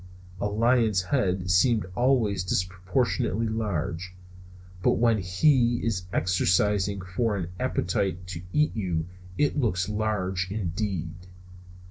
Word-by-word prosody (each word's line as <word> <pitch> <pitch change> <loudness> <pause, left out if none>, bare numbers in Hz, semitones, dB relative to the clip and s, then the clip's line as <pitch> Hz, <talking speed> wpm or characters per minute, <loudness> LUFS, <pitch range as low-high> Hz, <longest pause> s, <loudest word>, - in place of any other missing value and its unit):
A 105 - 0
lion's 110 -2 +2
head 90 -5 0
seems 110 +4 +3
always 120 -7 +2
disproportionately 95 +5 0
large, 95 -5 -3 0.7
but - - +3
when 115 -2 +2
he 120 +6 +3
is 95 -6 -2
exercising 95 +2 +1
for 115 -3 +1
an 90 -3 -4
appetite 90 0 -1
to 85 -2 -5
eat 150 +6 +1
you 90 -7 -1 0.3
it 145 0 +1
looks 95 -8 0
large 100 -4 -1
indeed. 95 -4 -3
100 Hz, 110 wpm, -26 LUFS, 90-115 Hz, 0.7 s, seems